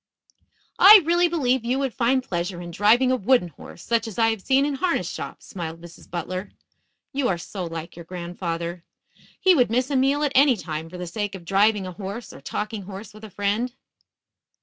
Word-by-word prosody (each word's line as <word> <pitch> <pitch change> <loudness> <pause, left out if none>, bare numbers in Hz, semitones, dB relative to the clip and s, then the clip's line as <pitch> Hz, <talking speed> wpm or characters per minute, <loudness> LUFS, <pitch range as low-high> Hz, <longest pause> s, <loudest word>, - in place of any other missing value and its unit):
"I 405 -1 +10
really 345 +1 +3
believe 260 -7 +1
you 245 +3 0
would 270 -3 -1
find 255 +2 +1
pleasure 175 -4 -3
in 175 -1 -7
driving 225 +8 +4
a - - +3
wooden 245 -5 +2
horse, 170 - -13
such 230 -1 0
as 220 - -8
I 225 -1 +4
have 225 -3 -2
seen 270 +6 +3
in 290 - -1
harness 335 +6 0
shops," - - -7
smiled 165 -3 -6
Mrs. 170 0 -14
Butler. 185 +3 -4 0.6
"You 270 -2 0
are 180 - 0
so 180 +2 -6
like 165 0 -7
your 170 0 -10
grandfather. 170 -1 -5 0.6
He 375 -1 +5
would 250 -9 +3
miss 250 +4 0
a - - 0
meal 275 +3 +2
at 290 - +1
any 270 -2 +5
time 160 -3 -5
for 180 - -9
the 180 - -5
sake 205 +3 -4
of 175 -3 -10
driving 200 +2 +3
a 185 - -5
horse 200 +5 -7
or - - -12
talking 210 0 -4
horse 195 +1 -9
with 215 +1 -14
a 220 - -8
friend." 205 +6 -1
210 Hz, 205 wpm, -24 LUFS, 180-260 Hz, 0.6 s, I